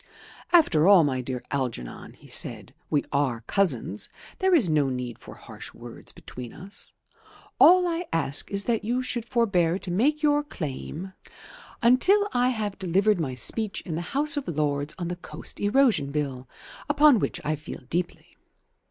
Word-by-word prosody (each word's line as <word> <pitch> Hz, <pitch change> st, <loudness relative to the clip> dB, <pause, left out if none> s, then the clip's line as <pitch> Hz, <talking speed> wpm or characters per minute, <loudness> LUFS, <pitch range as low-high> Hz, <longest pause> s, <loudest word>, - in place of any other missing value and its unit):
"After 190 Hz, -, +5 dB
all, 195 Hz, -4 st, +7 dB
my 130 Hz, -3 st, -1 dB
dear 125 Hz, 0 st, -5 dB
Algernon," 125 Hz, -, -4 dB
he -, -, -21 dB
said, -, -, -2 dB, 0.2 s
"we 145 Hz, -, +1 dB
are 135 Hz, -5 st, 0 dB
cousins. 125 Hz, -, 0 dB, 0.3 s
There 375 Hz, -1 st, +3 dB
is 255 Hz, -, +3 dB
no 150 Hz, -4 st, +2 dB
need 125 Hz, -2 st, -5 dB
for -, -, -12 dB
harsh -, -, -10 dB
words -, -, -11 dB
between 125 Hz, -2 st, -10 dB
us. 195 Hz, +3 st, -3 dB, 0.7 s
All 360 Hz, +1 st, +7 dB
I 340 Hz, 0 st, -3 dB
ask 145 Hz, -4 st, 0 dB
is 200 Hz, 0 st, 0 dB
that 230 Hz, -3 st, 0 dB
you 245 Hz, +4 st, -1 dB
should 240 Hz, -2 st, -3 dB
forbear 195 Hz, -9 st, +1 dB
to 185 Hz, -, -5 dB
make 290 Hz, -, +1 dB
your 295 Hz, -1 st, +3 dB
claim 175 Hz, -, -6 dB, 0.7 s
until 370 Hz, -, +5 dB
I 245 Hz, +1 st, +2 dB
have 215 Hz, -5 st, -3 dB
delivered 195 Hz, +2 st, +2 dB
my 135 Hz, -6 st, -3 dB
speech 215 Hz, -, -1 dB
in 170 Hz, -, -6 dB
the 165 Hz, -, -2 dB, 0.2 s
House 300 Hz, +2 st, +4 dB
of 280 Hz, -, -3 dB
Lords 145 Hz, -2 st, -1 dB
on 175 Hz, -2 st, -4 dB
the 175 Hz, 0 st, -4 dB
Coast -, -, -7 dB
Erosion 205 Hz, -, +2 dB
Bill, 135 Hz, -4 st, -4 dB, 0.4 s
upon 290 Hz, -4 st, +5 dB
which -, -, -2 dB
I 155 Hz, +1 st, 0 dB
feel 150 Hz, +1 st, -9 dB
deeply. 175 Hz, +4 st, -4 dB
180 Hz, 165 wpm, -26 LUFS, -, 0.7 s, all